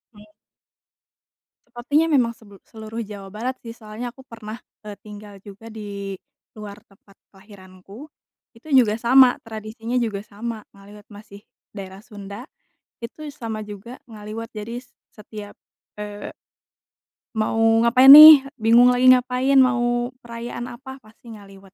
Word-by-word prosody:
Iya. 210 0 -18 1.3
Sepertinya 290 +7 -1
memang 235 -5 +1
sebel 205 -3 -18
seluruh 220 0 -10
Jawa 200 -2 -10
Barat 245 +5 -5
sih 230 - -9
soalnya 230 +1 -9
aku 265 - -17
pernah, 220 -1 -10 0.2
e 210 -1 -10
tinggal 205 -1 -13
juga 205 +3 -14
di 200 -2 -8 0.4
luar 210 0 -11
tempat 195 -2 -25 0.2
kelahiranku. 195 +6 -16 0.4
Itu 230 +7 -20
juga 225 -3 +3
sama 250 +1 +4
tradisinya 225 +2 -8
juga 220 -5 -2
sama 215 +2 -8
ngaliwet 205 +1 -17
masih 205 -1 -14 0.3
daerah 195 0 -10
Sunda, 205 +1 -11 0.6
itu 305 +6 -9
sama 225 -6 -7
juga 210 +4 -11
ngaliwet. 215 +2 -9
Jadi 220 +2 -8
s - - -29 0.2
setiap, 210 -1 -12 0.4
eee 205 0 -8 1.0
mau 220 +1 -2 0.2
ngapain 255 +4 +7
nih 305 -2 +10 0.2
bingung 240 +3 +5
lagi 255 +1 +3
ngapain 255 +2 +2
mau 240 -1 +1
perayaan 235 +1 -8
apa, 265 0 -12
pasti 225 +2 -16
ngaliwet. 195 -2 -16
220 Hz, 130 wpm, -21 LUFS, 205-240 Hz, 1.3 s, nih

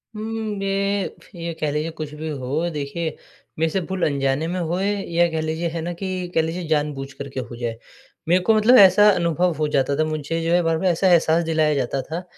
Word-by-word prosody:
उम्म, 225 +1 -4 0.2
मे 195 0 0
फ - - -19
ये 170 -1 -4
कह 150 -2 0
लीजिए 150 +2 -1
कुछ 150 -1 -5
भी 160 +1 -6
हो, 145 +4 -2
देखिए 155 +1 -4 0.4
मेरे 160 - +2
से 190 - 0
भूल 190 -2 -2
अनजाने 140 +1 0
में 180 +2 -2
होए 180 +4 -1 0.2
या 170 +1 +4
कह 160 - -1
लीजिए 160 +2 -2
है 165 0 -4
ना, 175 +1 -3
कि 185 0 -4
कह 160 - +5
लीजिए 165 +2 -4
जानबूझ 145 -3 -1
कर 140 0 -7
के 135 - -5
हो 120 -1 -7
जाए। 120 -1 -4 0.5
मेरे 180 +2 +4
को 225 - +4
मतलब 220 +4 +5
ऐसा 200 +2 +7
अनुभव 175 -1 +1
हो 155 0 0
जाता 140 -1 +1
था - - +4
मुझे 155 +1 -3
जो 165 - 0
है 175 - +4
बार-बार 165 +3 +1
ऐसा 175 +2 +2
एहसास 165 0 +4
दिलाया 155 -2 +2
जाता 135 0 -1
था, 165 +6 -6
165 Hz, 225 wpm, -22 LUFS, 150-180 Hz, 0.5 s, ऐसा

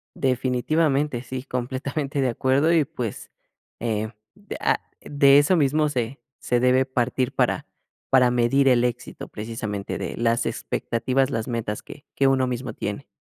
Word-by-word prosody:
Definitivamente. 135 +1 +1
Sí, 130 0 -5
completamente 135 +3 -3
de 130 - +2
acuerdo, 135 +7 +2
y 160 -4 +4
pues, 120 -6 -6 0.5
eh, 110 -2 -1 0.2
de 205 0 -9
ah, - - +2 0.2
de 140 -1 +5
eso 165 +5 +3
mismo 150 +1 +2
se 125 -1 -3 0.2
se 120 -1 0
debe 130 +1 +4
partir 130 0 -1
para - - +1 0.4
para 125 -2 +5
medir 130 +3 +3
el 125 -1 +4
éxito, 120 - -4
precisamente 105 -2 -5
de - - -4
las 115 0 +1
expectativas, 130 +3 -1
las 115 +1 -2
metas 110 -3 -3
que 145 - -12
que 135 - +3
uno 130 -1 +3
mismo 125 -1 -3
tiene. 105 +7 -5
130 Hz, 150 wpm, -24 LUFS, 120-140 Hz, 0.5 s, de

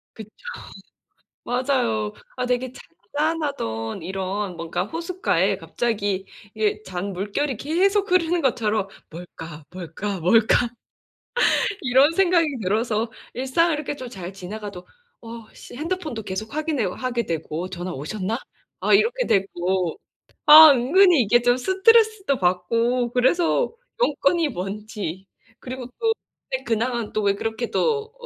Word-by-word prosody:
그쵸. 220 -2 -10 1.1
맞아요. 245 -4 0 0.2
아, 250 - -2
되게 250 0 -1
잔잔하던 280 - -3
이런 190 +1 -3
뭔가 170 +2 -3
호숫가에 340 - 0
갑자기 205 -5 -2 0.3
이게 215 -1 0
잔물결이 200 +8 -3
계속 385 - +1
흐르는 350 -1 +3
것처럼 220 -6 0 0.2
'뭘까, 165 -2 -10
뭘까, 185 +3 -5
뭘까?' 225 +6 +4 1.1
이런 265 +3 +4
생각이 350 -2 +3 0.2
들어서 220 +3 0 0.2
일상을 265 +7 +1
이렇게 295 -1 -4
좀 255 -3 -8
잘 190 -5 -8
지나가도 195 0 -8 0.3
'어, 230 -1 -10
씨.' - - -12
핸드폰도 310 -5 -4
계속 205 +3 -5
확인해오 295 - -1
하게 245 -3 -2
되고 165 +1 -4
'전화 180 0 -5
오셨나?' 190 - -3 0.4
아. - - +2
이렇게 470 +5 +3
되고. 185 -2 0 0.5
아. 310 +1 +11
은근히 310 +6 +5
이게 240 +2 +3
좀 245 0 +3
스트레스도 395 - +3
받고 230 +7 +1
그래서 335 - +2 0.3
용건이 310 - +2
뭔지 195 - -5 0.3
그리고 255 0 -7
또 455 -1 +2 0.5
근황은 235 0 -1
또 215 - 0
왜 200 0 +2
그렇게 225 +3 -3
또 445 -1 0
235 Hz, 265 characters per minute, -23 LUFS, 195-300 Hz, 1.1 s, 아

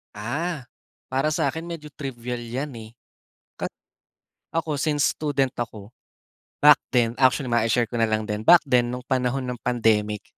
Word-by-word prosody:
Ah, 140 +7 -3 0.4
para 135 +3 0
sa'kin 160 +1 -1
medyo 150 -3 -7
trivial 125 -3 -5
yan 130 +4 -4
eh. 110 -1 -9 0.7
Kat - - -1 0.9
ako 155 -3 -1
since 150 -2 +2
student 140 -4 -1
ako, 110 -3 -6 0.7
back 150 0 +8 0.2
then 115 -2 +3
actually 130 -1 +3
mai-share 115 0 +2
ko 120 - -2
na 115 - +3
lang 110 0 0
din, 105 -1 -3
back 175 -1 +8
then 125 -4 +2
nung 125 +1 -5
panahon 130 0 0
nung 125 -1 -5
pandemic 110 -4 +1
125 Hz, 150 wpm, -24 LUFS, 115-145 Hz, 0.9 s, back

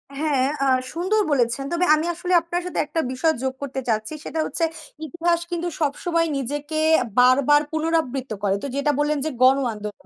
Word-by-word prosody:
হ্যাঁ, 280 -3 +1 0.2
আ - - +2 0.3
সুন্দর 380 +6 +1
বলেছেন। 245 0 +1
তবে 345 +1 +1
আমি 310 +2 -2
আসলে 360 +2 -3
আপনার 345 +1 -3
সাথে 360 - -3
একটা 325 - -3
বিষয় 315 +5 +1
যোগ 260 0 -1
করতে 270 -1 -4
চাচ্ছি 220 +5 -1
সেটা 320 - -4
হচ্ছে 330 - -2 0.4
ইতিহাস 340 +2 0
কিন্তু 345 0 -2
সবসময় 330 +3 0
নিজেকে 290 +4 -3 0.4
বারবার 270 +4 +5
পুনরাবৃত্ত 315 -6 -1
করে 195 -1 +2
তো - - -2
যেটা 280 +1 +1
বললেন 295 0 +1
যে 315 - 0
গণ 265 +2 +6 0.2
আন্দোলন। 210 0 -8
295 Hz, 175 wpm, -23 LUFS, 265-330 Hz, 0.4 s, গণ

